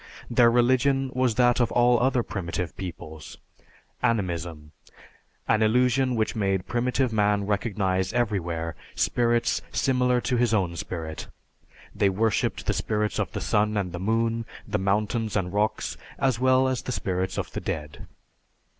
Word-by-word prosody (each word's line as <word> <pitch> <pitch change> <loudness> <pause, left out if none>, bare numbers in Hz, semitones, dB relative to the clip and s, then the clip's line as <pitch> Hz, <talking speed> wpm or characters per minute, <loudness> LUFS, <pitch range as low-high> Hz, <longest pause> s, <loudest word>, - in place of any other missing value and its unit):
Their 120 0 +6
religion 130 +3 +2
was 130 -3 +1
that 120 0 +3
of 120 - +2
all 120 0 +4
other 125 -1 +2
primitive 90 -4 -4
peoples 80 -4 -8 0.6
Animism, 85 -8 -2 0.8
an 110 - +3
illusion 125 +3 +3
which 110 -1 0
made 95 -3 0
primitive 125 0 0
man 105 -1 +2
recognize 100 -2 0
everywhere 85 -9 -1 0.2
spirits 120 -1 +1
similar 125 -2 +2
to 125 0 -1
his 120 -2 +2
own 90 -5 0
spirit. 80 -2 -5 0.7
They 100 - +2
worshiped 110 +3 0
the - - +1
spirits 105 0 -1
of - - -2
the - - -3
sun 105 0 +1
and 95 -3 -1
the 85 - -5
moon, 115 +3 0 0.2
the 105 0 -1
mountains 105 +3 0
and 90 -2 -2
rocks, 105 +1 -1 0.2
as 130 -4 +1
well 130 +1 +4
as 130 -1 -1
the - - -5
spirits 95 -4 -2
of - - -3
the - - -5
dead. 75 -1 -5
110 Hz, 145 wpm, -26 LUFS, 95-120 Hz, 0.8 s, Their